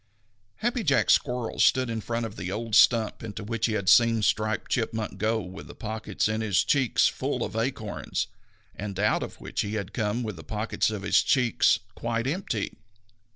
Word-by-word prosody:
_ - - -43 0.6
Happy 240 +1 +1
Jack 145 -7 +3
Squirrel 125 -3 +1
stood 130 0 +4
in 115 -1 -3
front 115 +1 -2
of 110 - -7
the 90 - -5
old 115 +2 -4
stump 115 0 +4
into 105 -2 -6
which 115 +2 -1
he 110 - -1
had 100 -3 -2
seen 115 0 +5
Striped 110 +1 0
Chipmunk 110 -4 -2
go 110 +2 +1
with 90 +1 -9
the - - -11
pockets 110 -2 -2
in 110 +1 -1
his 100 -3 +2
cheeks 130 +1 +3
full - - -2
of - - -8
acorns, 115 -2 -2 0.5
and 100 -1 -6
out 105 +1 +2
of - - -7
which - - -3
he 105 +1 -3
had 100 0 -4
come 110 +1 -1
with 110 -6 -5
the 80 - -10
pockets 105 +8 -1
of 105 -3 -5
his - - +4
cheeks 125 -5 +3 0.2
quite 115 +2 -2
empty. 135 - -3
110 Hz, 195 wpm, -27 LUFS, 105-115 Hz, 0.6 s, seen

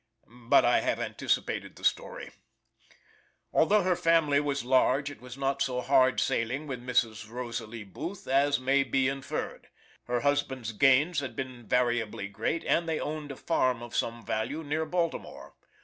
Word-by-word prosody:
But - - +6
I - - +4
have - - -1
anticipated - - -2
the - - -15
story: - - -1 1.2
Although 205 +5 +4
her 180 0 +2
family 165 -4 +3
was 140 -3 -2
large, 130 +2 +3
it 145 - -13
was 125 0 -10
not 135 0 -1
so 130 -2 0
hard 130 -1 +4
sailing 125 +6 -1
with 130 -4 -5
Mrs. 115 -3 0
Rosalie 120 -2 -5
Booth 160 - -7
as 140 +1 +3
may 135 +2 +3
be 135 0 +1
inferred. 135 -1 -4 0.4
Her 120 0 -1
husband's 130 -5 0
gains 135 +8 +4
had 130 -5 -5
been 125 -3 -6
variably 120 -5 0
great, 110 +11 -2
and 170 -1 +1
they 160 - 0
owned 150 -1 -4
a - - -6
farm 130 -6 0
of 120 - -8
some 115 0 -2
value 140 +9 -2
near 155 +2 -2
Baltimore. 170 0 -3
135 Hz, 160 wpm, -29 LUFS, 120-145 Hz, 1.2 s, But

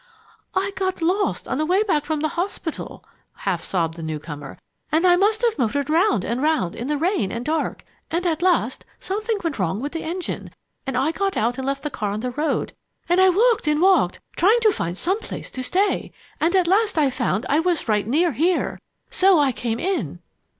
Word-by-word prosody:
"I 390 +1 +1
got 375 -3 -2
lost 380 +5 0
on 260 - -2
the 310 - +1
way 375 +4 +3
back 310 -8 0
from 310 -2 -1
the 310 - +1
hospital," 345 -1 -4 0.3
half 185 -4 -2
sobbed 165 -4 -1
the - - -7
new 160 -1 -3
comer, 150 -2 -8 0.3
"and 320 +4 +3
I 355 -1 +6
must 425 +5 +2
have 460 -9 +1
motored 280 +5 0
round 320 - +3
and 240 +3 -2
round 300 - +1
in 240 - -5
the 295 0 0
rain 315 - 0
and 235 +1 -4
dark. 315 +1 -2 0.2
And 345 +2 -1
at 325 -2 0
last 365 -1 +1 0.2
something 430 +3 -2
went 320 -8 -2
wrong 185 +2 0
with 285 +4 -4
the 330 - -4
engine, 350 +3 -4 0.4
and 265 -2 -1
I 275 +5 +2
got 390 +3 -1
out 240 +4 0
and 265 - -3
left 275 0 -2
the 295 - -3
car 210 -4 -2
on 205 +2 -3
the 250 +1 -2
road 300 +5 -1 0.3
and 350 +2 +4
I 375 - +7
walked 435 0 +3
and 300 0 +3
walked 375 +2 +3 0.2
trying 420 +7 +4
to 435 -1 +5
find 170 +2 -3
some 380 - 0
place - - -7
to 260 - -5
stay 375 +10 0 0.3
and 335 +4 +2
at 370 -2 +4
last 400 +2 +2
I 290 -4 +3
found 235 -5 -1
I 290 - +3
was 340 -4 0
right 210 -2 +1
near 325 +8 +2
here 335 +8 0 0.3
so 380 -1 +5
I 285 -3 +3
came 230 -1 -3
in!" 330 - -2
315 Hz, 215 wpm, -22 LUFS, 245-370 Hz, 0.4 s, I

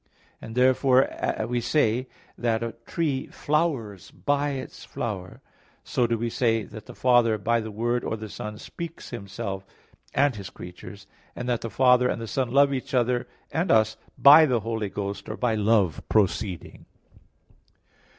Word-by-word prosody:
As 110 - -8
therefore 130 -2 +2
we 120 0 -1
say 125 -1 +1 0.3
that 115 -1 0
a 115 - -2 0.2
tree 145 -6 -1
flowers 140 - -1
by 145 0 0
its 130 -1 -7
flower, 95 -5 -5 0.4
so 120 - +1
do 115 0 0
we 120 +2 -2
say 115 -1 +1
that 105 +1 -11
the - - -10
Father, 120 -3 +4
by 115 +3 +1
the 110 - -6
Word 120 +3 -1
or 110 - -2
the 110 0 -7
Son, 105 +1 -7
speaks 170 +8 -8
Himself, 100 -3 -5 0.5
and 140 -2 +3
His 100 -1 -7
creatures; 90 +3 -11 0.3
and 125 - -5
that 120 -2 0
the 115 - -4
Father 125 +2 +4
and - - -2
the 115 - -5
Son 130 +2 -1
love 140 +2 +4
each 130 0 -3
other 125 0 +1 0.2
and 175 +4 0
us, 110 -1 +4 0.2
by 155 +3 +9
the 120 -4 +1
Holy 110 -1 -2
Ghost, 100 0 -5
or 110 - -4
by 120 -2 +1
Love 105 -6 +2
proceeding. 100 -3 -1
115 Hz, 160 wpm, -26 LUFS, 105-130 Hz, 0.5 s, by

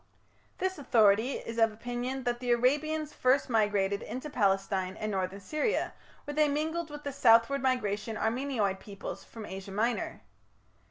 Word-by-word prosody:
This 375 -2 -2
authority 225 -1 +4
is 230 0 -5
of 225 -1 +5
opinion 245 +4 -4
that 240 0 -1
the 250 0 -4
Arabians 300 +5 +1
first 255 +1 +2
migrated 205 -3 +2
into 255 +7 -6
Palestine 195 -3 0
and 215 0 -3
northern 190 0 -2
Syria, 305 - -1 0.3
where 290 - -5
they 305 0 +4
mingled 315 +3 -1
with 295 0 -8
the 285 - -3
southward 235 +2 +5
migrating 225 -4 0
Armenoid 220 -4 0
peoples 200 -1 -7
from 225 -2 -9
Asia 195 0 -7
Minor. 225 +4 -1
240 Hz, 150 wpm, -30 LUFS, 205-280 Hz, 0.3 s, of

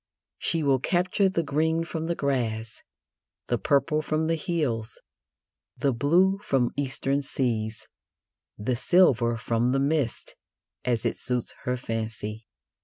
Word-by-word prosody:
She 165 -2 +3
will 135 -2 +3
capture 180 +6 +2
the 170 -3 0
green 160 +3 +1
from 160 0 -4
the 170 - 0
grass, 115 -6 -2 0.7
the 120 - +1
purple 150 +1 +2
from 155 +1 -1
the 165 - +1
hills, 140 -9 -2 0.8
the 140 -2 +1
blue 175 +10 +3
from 135 -10 +1
Eastern 140 0 0
seas, 115 -5 -2 0.7
the 120 +4 -1
silver 120 -6 +3
from 115 +2 0
the 135 - +2
mists, 140 -3 -1 0.5
as 120 -3 0
it - - 0
suits 125 -2 -2
her 125 0 0
fancy. 110 -2 -5
135 Hz, 130 wpm, -26 LUFS, 115-160 Hz, 0.8 s, She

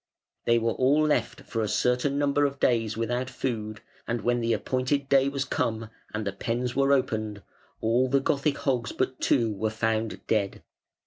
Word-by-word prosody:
They 120 - +4
were 115 0 +1
all 140 +6 +3
left 135 -6 0
for 115 - -3
a 110 - 0
certain 125 +6 +1
number 145 0 +2
of 140 -1 0
days 115 -3 +1
without 120 +3 -1
food, 110 -5 -4 0.3
and 115 -1 -1
when 120 +3 +1
the 115 0 0
appointed 130 +6 0
day 135 0 +4
was 140 0 -2
come, 110 -1 -2 0.2
and 105 0 -3
the 100 - -1
pens 120 +4 -2
were 135 +1 +3
opened, 110 -6 0 0.4
all 120 +3 +2
the 140 +1 +3
"Gothic" 140 +1 0
hogs 125 -4 -1
but 130 0 -1
two 115 -5 +2
were 110 +2 -1
found 110 0 -2
dead. 100 -3 -1
120 Hz, 180 wpm, -27 LUFS, 110-135 Hz, 0.4 s, They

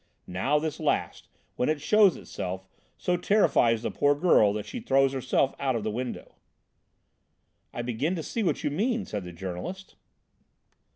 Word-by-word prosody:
Now 95 +12 0
this 155 0 -3
last, - - -1 0.3
when 125 - +1
it 155 -1 0
shows 210 +1 +5
itself, 95 +1 -6 0.3
so 180 0 0
terrifies 120 - +3
the - - -2
poor 145 0 +2
girl 145 - +4
that 105 0 -4
she - - -6
throws 135 0 +2
herself 130 +1 +1
out 135 -2 0
of 115 - -2
the 110 - -1
window." 125 +3 -5 1.4
"I 120 - -4
begin 125 +9 -1
to 165 - -4
see 230 - -3
what 190 - 0
you - - 0
mean," 225 - 0
said 105 - -5
the 90 - -7
journalist. 95 - -6
135 Hz, 165 wpm, -27 LUFS, 110-175 Hz, 1.4 s, shows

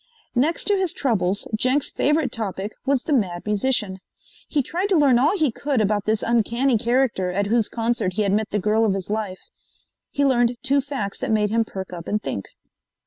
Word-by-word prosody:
Next 290 +7 +1
to 410 - +2
his 380 -4 0
troubles, 205 -7 0
Jenks' 260 +5 +1
favorite 295 -3 +1
topic 205 -2 -3 0.2
was 275 -2 +2
the 305 - -1
Mad 180 -9 0
Musician. 210 -2 0 0.5
He 290 -3 0
tried 360 +9 -2
to 380 - +3
learn 270 -5 +4
all 305 +10 +3
he 305 -7 +2
could 280 +2 -1
about 210 -1 +1
this 220 0 0
uncanny 235 +3 +2
character 235 -4 +1
at 200 +3 -1
whose 225 +1 +1
concert 230 -5 -1
he 210 +3 0
had 200 -1 +1
met 215 +1 0
the 210 - -1
girl 210 +3 +2
of 205 -3 +2
his 195 +1 -5
life. 210 -4 -4 0.6
He 285 - 0
learned 245 -2 +2
two 280 0 +3
facts 260 -8 -4
that - - -3
made 210 -1 +1
him 230 0 +2
perk 190 -3 -7
up 170 -1 -8
and 210 - 0
think. 100 - -5
230 Hz, 200 wpm, -23 LUFS, 205-270 Hz, 0.6 s, learn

